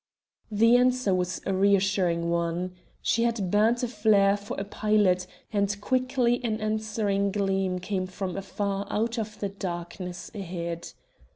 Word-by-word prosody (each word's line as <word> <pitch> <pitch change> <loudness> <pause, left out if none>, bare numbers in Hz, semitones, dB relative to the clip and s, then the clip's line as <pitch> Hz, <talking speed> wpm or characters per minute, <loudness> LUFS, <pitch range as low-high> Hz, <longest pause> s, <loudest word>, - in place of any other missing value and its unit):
The 230 +3 +5
answer 250 -4 +3
was 180 -1 -1
a 195 - 0
reassuring 190 -3 +2
one. 170 +2 -1 0.3
She 230 - +2
had 230 -6 0
burnt 225 +4 +3
a - - +1
flare 210 -3 +4
for 205 -1 -6
a - - -1
pilot, 200 -3 +2 0.3
and 200 0 +1
quickly 255 +1 +1
an 220 -2 -1
answering 215 -2 0
gleam 195 -2 0
came 185 0 -2
from 185 -1 -4
afar 200 0 -3
out 230 +2 0
of 210 -1 -5
the 200 - -2
darkness 180 -1 -6
ahead. 170 -4 -5
200 Hz, 145 wpm, -27 LUFS, 185-215 Hz, 0.3 s, The